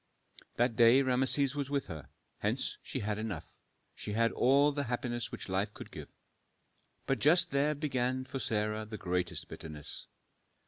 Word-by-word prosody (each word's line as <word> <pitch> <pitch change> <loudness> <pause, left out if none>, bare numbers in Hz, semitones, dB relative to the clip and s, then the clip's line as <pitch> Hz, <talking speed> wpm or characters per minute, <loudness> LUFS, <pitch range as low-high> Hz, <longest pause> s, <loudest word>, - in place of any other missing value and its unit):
That 120 -1 +2
day 120 +3 +7
Rameses 130 +1 +2
was 140 -2 -3
with 140 -1 0
her; 80 -6 -8 0.3
hence - - -1
she - - -4
had 105 0 -1
enough, 105 -8 -5 0.4
she 105 - -5
had 115 +1 +3
all 140 +3 +4
the 145 0 -2
happiness 120 -2 -2
which - - -5
life 100 +2 -1
could - - -9
give. - - -8 1.0
But 135 -3 0
just 160 +8 +5
there 145 +2 +2
began 130 -3 0
for 130 +1 -5
Sarah 105 -1 0
the 110 0 -7
greatest 90 -2 -2
bitterness. 75 -2 -7
120 Hz, 155 wpm, -32 LUFS, 105-135 Hz, 1.0 s, day